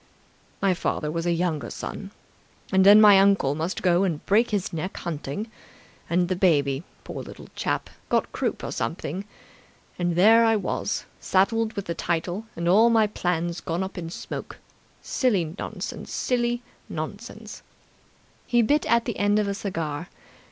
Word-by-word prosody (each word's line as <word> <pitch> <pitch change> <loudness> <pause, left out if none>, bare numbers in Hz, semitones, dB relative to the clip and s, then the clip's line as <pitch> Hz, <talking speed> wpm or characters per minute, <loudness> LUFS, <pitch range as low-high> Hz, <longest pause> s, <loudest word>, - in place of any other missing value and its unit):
"My 195 -1 +4
father 150 -3 -2
was 165 +1 -2
a - - +3
younger 165 -7 -1
son. - - -6 0.6
And 190 0 +5
then 205 +2 +9
my 205 -2 +8
uncle 195 -8 +4
must 160 +6 -3
go 180 0 +4
and 170 -6 -2
break 225 +4 +3
his 205 -5 -2
neck 165 +4 -4
hunting, 170 +5 -4 0.6
and 175 +1 +2
the 185 - 0
baby, 145 -7 +2 0.2
poor - - -6
little - - -11
chap, - - -1 0.2
got - - +1
croup - - -2
or - - -4
something... 165 - -3 0.7
And 175 -1 0
there 220 +6 +6
I 225 -1 +4
was, 210 - -2
saddled 220 +4 +1
with 200 -3 -4
the 170 - -2
title, 175 +6 -2
and 170 0 -3
all 215 +6 +6
my 225 -2 +4
plans 175 -4 -2
gone 170 +3 -2
up 190 - -6
in 165 -2 -5
smoke... - - -7 0.5
Silly 195 - 0
nonsense! - - -6
Silly 240 -1 0 0.3
nonsense!" 205 +7 -7 0.9
He 240 -1 +3
bit 295 +7 +2 0.2
the 235 - -4
end 205 +1 +3
of 210 -1 +1
a 200 - -1
cigar. 165 -6 -4
185 Hz, 160 wpm, -25 LUFS, 170-215 Hz, 0.9 s, then